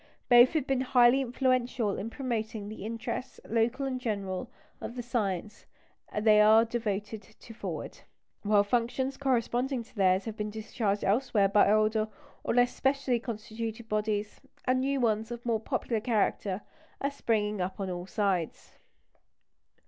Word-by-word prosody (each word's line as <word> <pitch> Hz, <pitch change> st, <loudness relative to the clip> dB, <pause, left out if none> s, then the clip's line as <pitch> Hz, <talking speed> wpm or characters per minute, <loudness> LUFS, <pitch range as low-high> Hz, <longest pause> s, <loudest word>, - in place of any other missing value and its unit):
Both 245 Hz, +1 st, +7 dB
have 310 Hz, -5 st, 0 dB
been 270 Hz, -2 st, 0 dB
highly 250 Hz, 0 st, +5 dB
influential 250 Hz, -4 st, 0 dB
in 210 Hz, +4 st, -4 dB
promoting 225 Hz, -5 st, -3 dB
the 215 Hz, -, -8 dB
interests, 230 Hz, +3 st, -5 dB
local 235 Hz, +4 st, +1 dB
and 255 Hz, -2 st, -3 dB
general, 200 Hz, -1 st, -3 dB, 0.3 s
of 235 Hz, -, -6 dB
the 245 Hz, -, -4 dB
science 210 Hz, -4 st, -3 dB, 0.5 s
they 210 Hz, 0 st, +5 dB
are 220 Hz, +2 st, +6 dB
devoted 220 Hz, -2 st, -3 dB
to 225 Hz, +2 st, -15 dB
forward; 225 Hz, -, -6 dB, 0.4 s
while 205 Hz, -1 st, +4 dB
functions 245 Hz, +5 st, 0 dB
corresponding 255 Hz, -1 st, 0 dB
to 230 Hz, -, -23 dB
theirs 190 Hz, -1 st, +3 dB
have 220 Hz, -2 st, -5 dB
been 210 Hz, -1 st, -3 dB
discharged 210 Hz, -1 st, -2 dB
elsewhere 210 Hz, -2 st, +2 dB
by 205 Hz, 0 st, +5 dB
older 215 Hz, 0 st, +2 dB, 0.4 s
or -, -, -1 dB
less 245 Hz, 0 st, +4 dB
specially 270 Hz, -2 st, +1 dB
constituted 225 Hz, 0 st, -6 dB
bodies, 210 Hz, -1 st, -2 dB, 0.2 s
and 255 Hz, 0 st, +2 dB
new 275 Hz, +1 st, 0 dB
ones 220 Hz, -2 st, +1 dB
of 240 Hz, 0 st, -7 dB
a -, -, -5 dB
more 225 Hz, -2 st, +2 dB
popular 225 Hz, +1 st, -2 dB
character 210 Hz, -4 st, 0 dB, 0.4 s
are 280 Hz, -, -1 dB
springing 210 Hz, -6 st, 0 dB
up 185 Hz, +3 st, -3 dB
on 190 Hz, -2 st, -2 dB
all 175 Hz, 0 st, -5 dB
sides. 195 Hz, -6 st, -2 dB
225 Hz, 150 wpm, -29 LUFS, 210-245 Hz, 0.5 s, Both